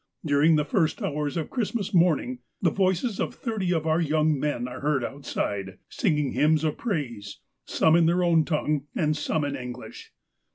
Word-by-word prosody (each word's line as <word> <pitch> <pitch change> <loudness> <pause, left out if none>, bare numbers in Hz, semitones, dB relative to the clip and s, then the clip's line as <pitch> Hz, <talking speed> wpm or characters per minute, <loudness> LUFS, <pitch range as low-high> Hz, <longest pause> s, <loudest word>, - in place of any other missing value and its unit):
During 150 +2 +4
the 150 -1 +1
first 160 +1 +1
hours 150 +1 -2
of 160 - -3
Christmas 225 -4 -2
morn 170 -4 +4
ing 125 0 -6 0.2
the 170 - +2
voices 190 +4 0
of - - -2
thirty 215 -7 -2
of 160 -3 0
our 160 +1 +2
young 155 -2 +1
men 130 -4 -1
are 125 0 -7
heard 145 -3 0
outside, 100 -8 -4
singing 150 - 0
hymns 155 +1 +2
of 155 -2 0
praise, 125 - -4 0.3
some 160 0 +3
in 170 -1 +4
their 175 +2 +2
own 165 -2 +4
tongue, 150 -2 -1
and 155 -2 +1
some 150 0 -1
in 140 0 -2
English. 125 -1 -8
155 Hz, 180 wpm, -26 LUFS, 140-170 Hz, 0.3 s, During